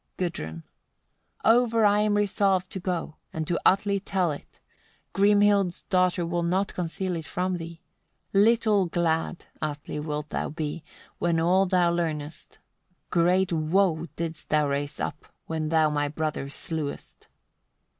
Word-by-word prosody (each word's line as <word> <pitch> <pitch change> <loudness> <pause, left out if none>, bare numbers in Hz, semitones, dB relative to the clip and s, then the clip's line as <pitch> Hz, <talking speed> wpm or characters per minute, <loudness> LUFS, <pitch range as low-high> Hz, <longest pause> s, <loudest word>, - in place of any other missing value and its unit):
Gudrun. 80 - -4 0.8
77. 230 +3 +6
Over 230 -2 +2
I 205 0 +4
am 210 0 +2
resolved 195 -2 +1
to 190 - -4
go, 175 -4 -3
and 160 0 -3
to 170 +2 -1
Atli 200 +1 +3
tell 190 -3 0
it. 145 - -10 0.5
Grimhild's 200 -2 +3
daughter 180 -1 +1
will 170 +1 -1
not 185 +4 0
conceal 180 +1 -3
it 160 -2 -5
from 180 0 -1
thee. 165 0 -9 0.5
Little 210 -1 +4
glad, 170 0 -1 0.2
Atli! 150 0 -4
wilt 150 0 -4
thou - - -2
be, 155 +1 -4 0.4
when 170 -1 +1
all 185 +4 +3
thou 180 -2 +3
learnest; 155 -3 -3 0.5
great 180 +1 +3
woe 165 +1 +1
didst 165 -1 -5
thou 150 -1 +3
raise 140 +1 -3
up, 150 - -4 0.2
when 160 -1 -2
thou 160 -1 +3
my 145 0 0
brother 150 -2 -3
slewest. 150 0 -5
170 Hz, 140 wpm, -26 LUFS, 155-190 Hz, 0.8 s, 77